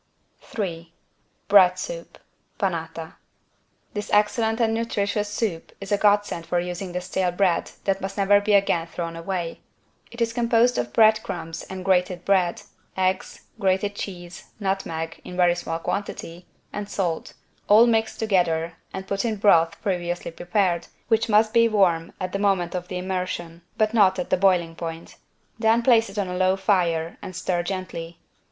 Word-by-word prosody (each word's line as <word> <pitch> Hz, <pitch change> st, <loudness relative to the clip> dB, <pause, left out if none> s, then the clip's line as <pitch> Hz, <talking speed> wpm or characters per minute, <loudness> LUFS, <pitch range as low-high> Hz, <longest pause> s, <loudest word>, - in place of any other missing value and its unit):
3 170 Hz, -6 st, -5 dB, 0.6 s
BREAD 185 Hz, -2 st, +6 dB
SOUP -, -, -6 dB, 0.4 s
(Panata) 165 Hz, -4 st, -3 dB, 0.8 s
This 210 Hz, -1 st, -4 dB
excellent 220 Hz, +2 st, +2 dB
and 225 Hz, -2 st, +2 dB
nutritious 210 Hz, -2 st, -1 dB
soup 205 Hz, -6 st, -3 dB
is 195 Hz, 0 st, -8 dB
a 205 Hz, -, +3 dB
godsend 205 Hz, -5 st, +2 dB
for 175 Hz, -, +1 dB
using 180 Hz, +1 st, -4 dB
the 180 Hz, +1 st, -3 dB
stale 185 Hz, 0 st, -1 dB
bread 175 Hz, -1 st, +1 dB
that 195 Hz, 0 st, 0 dB
must 195 Hz, +2 st, -5 dB
never 200 Hz, 0 st, +5 dB
again 200 Hz, -5 st, +2 dB
be -, -, -22 dB
thrown 165 Hz, -1 st, -4 dB
away. 170 Hz, 0 st, -4 dB, 0.5 s
It 235 Hz, -, -12 dB
is 230 Hz, -1 st, 0 dB
composed 235 Hz, +1 st, +3 dB
of 120 Hz, 0 st, -3 dB
bread 220 Hz, -, +5 dB
crumbs 170 Hz, -5 st, -6 dB
and 190 Hz, -1 st, -7 dB
grated 180 Hz, -1 st, +1 dB
bread, 185 Hz, -3 st, +2 dB, 0.3 s
eggs, 185 Hz, 0 st, -1 dB, 0.2 s
grated 195 Hz, +1 st, +1 dB
cheese, 175 Hz, -3 st, -7 dB
nutmeg 170 Hz, -5 st, -3 dB
(in 180 Hz, -, -8 dB
very 175 Hz, -1 st, +4 dB
small 170 Hz, -2 st, -4 dB
quantity) 175 Hz, -1 st, -5 dB, 0.3 s
and 205 Hz, 0 st, -5 dB
salt, 175 Hz, -5 st, -2 dB, 0.3 s
all 215 Hz, +3 st, +7 dB
mixed 225 Hz, -2 st, +1 dB
together 170 Hz, -6 st, 0 dB
and 190 Hz, 0 st, -6 dB
put 200 Hz, 0 st, -1 dB
in 225 Hz, -2 st, 0 dB
broth 170 Hz, -5 st, +3 dB
previously 175 Hz, -3 st, -2 dB
prepared, 175 Hz, 0 st, 0 dB, 0.2 s
which 225 Hz, 0 st, +2 dB
must 215 Hz, +1 st, +4 dB
be 230 Hz, -1 st, +5 dB
warm 175 Hz, -6 st, +2 dB
at 185 Hz, 0 st, -3 dB
the 195 Hz, -, -2 dB
moment 195 Hz, -4 st, +1 dB
of 180 Hz, -1 st, -4 dB
the 180 Hz, -, -4 dB
immersion, 180 Hz, -2 st, -4 dB, 0.2 s
but 215 Hz, 0 st, +2 dB
not 195 Hz, -4 st, +4 dB
at 180 Hz, -, -4 dB
the -, -, +5 dB
boiling 180 Hz, -3 st, +2 dB
point. 165 Hz, 0 st, -7 dB, 0.4 s
Then 225 Hz, +1 st, +3 dB
place 230 Hz, -4 st, +4 dB
it 195 Hz, -, -11 dB
on 200 Hz, -2 st, 0 dB
a 180 Hz, 0 st, -4 dB
low 185 Hz, +1 st, +3 dB
fire 175 Hz, -4 st, 0 dB
and 185 Hz, -, -8 dB
stir 180 Hz, -1 st, -1 dB
gently. 175 Hz, -2 st, -5 dB
190 Hz, 165 wpm, -24 LUFS, 175-205 Hz, 0.8 s, all